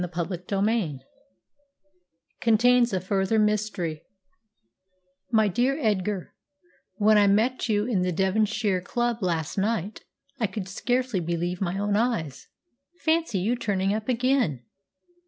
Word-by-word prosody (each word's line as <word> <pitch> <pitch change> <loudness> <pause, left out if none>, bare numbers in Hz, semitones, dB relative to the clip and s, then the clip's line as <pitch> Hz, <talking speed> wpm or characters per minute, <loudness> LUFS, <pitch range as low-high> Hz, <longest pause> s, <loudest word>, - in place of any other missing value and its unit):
CHAPTER 175 +1 -3
XXIX 195 - -1 1.4
CONTAINS 240 +2 +4
A 190 - 0
FURTHER 195 +3 0
MYSTERY 210 -7 0 1.3
"My 220 -2 +4
dear 245 +8 +1
Edgar, 205 - -1 0.6
when 215 0 +4
I 205 - +5
met 230 +5 +1
you 210 -1 +2
in 220 -7 0
the 180 0 0
Devonshire 200 +1 +1
Club 240 +4 -2
last 170 -1 -1
night 210 -1 -2 0.4
I 220 - +1
could 195 -1 -6
scarcely 245 +2 -1
believe 175 +2 -2
my 190 0 -1
own 205 0 0
eyes. 210 - -1 0.5
Fancy 320 -8 +1
you 225 +6 +1
turning 195 -4 0
up 215 +3 -4
again!" 245 - +1
205 Hz, 120 wpm, -26 LUFS, 185-230 Hz, 1.4 s, I